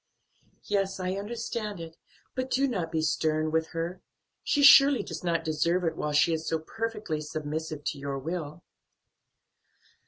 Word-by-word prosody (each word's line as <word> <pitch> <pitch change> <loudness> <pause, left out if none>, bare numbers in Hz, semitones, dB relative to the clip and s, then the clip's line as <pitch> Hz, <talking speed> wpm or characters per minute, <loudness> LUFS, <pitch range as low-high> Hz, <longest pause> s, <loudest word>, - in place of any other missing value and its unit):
"Yes, 195 -2 -1
I 185 0 -1
understand 210 0 -4
it, 165 -1 -8 0.4
but 255 0 -3
do 275 +2 +2
not 185 -10 -2
be 160 -1 0
stern 155 0 +1
with 160 0 +1
her; 170 +2 -4 0.4
she 290 -3 +2
surely 275 0 +8
does 165 0 -7
not 170 -2 0
deserve 165 +3 +1
it 165 - 0
while 150 - -2
she 150 +3 +4
is 160 0 -3
so 160 - +1
perfectly 210 -1 -4
submissive 155 0 -4
to 150 -1 -3
your 140 0 -3
will." 155 +2 -5
165 Hz, 155 wpm, -28 LUFS, 155-200 Hz, 0.4 s, surely